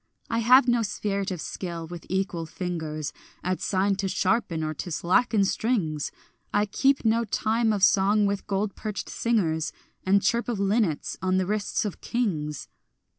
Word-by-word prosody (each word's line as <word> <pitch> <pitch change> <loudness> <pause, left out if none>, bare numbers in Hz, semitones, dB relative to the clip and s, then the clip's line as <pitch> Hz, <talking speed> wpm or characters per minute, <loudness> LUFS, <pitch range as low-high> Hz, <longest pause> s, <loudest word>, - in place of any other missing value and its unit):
I 230 - +1
have 250 +3 +6
no 240 -1 +3
spirit 200 -2 -2
of 180 -3 -4
skill 170 -3 -5
with 170 +1 -9
equal 185 -3 -1
fingers 160 -4 -4 0.3
At 185 0 -1
sign 195 0 +1
to 195 0 -1
sharpen 190 -3 0
or 155 0 -2
to 165 - -6
slacken 195 +5 +2
strings; 185 - 0 0.4
I 205 0 +2
keep 270 +6 +2
no 225 +1 +3
time 225 +1 +1
of 205 -3 -1
song 205 +2 +4
with 200 0 -2
gold 200 0 -1
perched 210 -2 -5
singers 170 -9 0 0.3
And 195 +1 +3
chirp 235 +1 +1
of 230 -4 -2
linnets 200 -6 0
on 185 0 +1
the 190 - +1
wrists 210 +2 -1
of 205 - -5
kings. 155 - -2
195 Hz, 165 wpm, -26 LUFS, 175-220 Hz, 0.4 s, have